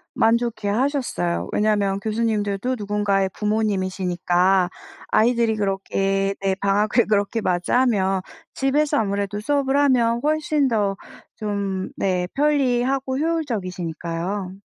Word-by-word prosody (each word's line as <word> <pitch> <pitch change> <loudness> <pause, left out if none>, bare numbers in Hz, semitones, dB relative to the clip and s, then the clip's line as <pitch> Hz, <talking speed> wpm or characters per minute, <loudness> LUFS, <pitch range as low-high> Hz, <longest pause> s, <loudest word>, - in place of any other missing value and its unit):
만족해하셨어요. 225 - 0
왜냐하면 205 -2 +1
교수님들도 215 +1 -1
누군가의 205 -2 0
부모님이시니까 185 -3 +1 0.4
아이들이 230 0 +3
그렇게 195 -1 -1
네 195 -1 +1
방학을 210 +4 +2
그렇게 210 +2 +1
맞이하면 195 +1 +1 0.3
집에서 290 +2 +1
아무래도 200 0 -2
수업을 280 +2 0
하면 245 -5 +3
훨씬 305 -1 +1
더 205 -5 0 0.4
좀 200 -3 -3
네 180 -2 0
편리하고 270 -2 +1
효율적이시니까요. 185 - -3
210 Hz, 305 characters per minute, -22 LUFS, 195-245 Hz, 0.4 s, 아이들이